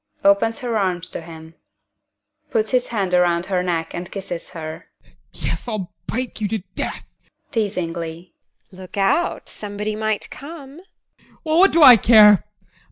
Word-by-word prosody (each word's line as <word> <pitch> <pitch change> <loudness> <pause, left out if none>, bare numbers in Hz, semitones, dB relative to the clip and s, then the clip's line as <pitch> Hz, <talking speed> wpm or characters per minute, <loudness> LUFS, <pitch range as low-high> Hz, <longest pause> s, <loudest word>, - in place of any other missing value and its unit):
[Opens 200 +3 +3
her 235 -3 -1
arms 185 -2 -1
to - - -6
him.] 160 -1 -12 1.0
ADOLPH. - - -36
[Puts 220 -1 0
his 250 -1 +1
hands 195 -5 -2
around 175 -1 +2
her 185 -2 0
neck 170 -3 -2
and 175 0 -6
kisses 185 -4 -6
her] 160 -1 -8 0.4
Yes, - - -4
I'll 195 -6 -4
bite 250 -2 -4
you 210 - +1
to 220 - -1 0.2
death! - - -5 0.5
TEKLA. 170 -5 -3
[Teasingly] - - -50 0.4
Look 185 +1 -11
out 195 - +1
somebody 210 +1 -5
might 215 -1 -2
come! 285 -1 -10
ADOLPH. 385 - -31
Well, 315 +1 +2
what 390 +2 +6
do 330 -1 +5
I 250 -4 +11
care! 210 -2 +6
200 Hz, 160 wpm, -21 LUFS, 175-225 Hz, 1.0 s, I